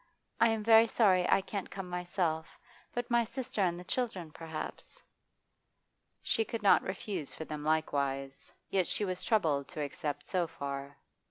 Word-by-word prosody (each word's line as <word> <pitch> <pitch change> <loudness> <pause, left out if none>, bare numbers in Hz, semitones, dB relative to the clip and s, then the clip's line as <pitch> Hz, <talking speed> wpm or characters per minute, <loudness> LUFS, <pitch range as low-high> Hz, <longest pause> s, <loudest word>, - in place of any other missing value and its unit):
'I 230 - +6
am 220 -1 0
very 225 +1 +7
sorry 190 -6 +4
I 195 - +5
can't 195 0 -5
come 195 -1 -6
myself, 175 -2 -2 0.3
but 245 0 -3
my 235 0 +5
sister 245 -1 -4
and 175 -2 +1
the - - -8
children 190 -7 -2
perhaps 160 - -7 0.6
' - - -48
She 225 - +2
could 225 0 -5
not 200 - +7
refuse 190 -4 -4
for 160 - -6
them 150 -1 -5
likewise, 140 -3 -1 0.2
yet 185 -3 +2
she 210 - 0
was 185 -1 -3
troubled 155 -11 +2
to 150 - -6
accept 145 0 -4
so 180 -3 0
far. 140 -2 -5
180 Hz, 165 wpm, -32 LUFS, 155-215 Hz, 0.6 s, very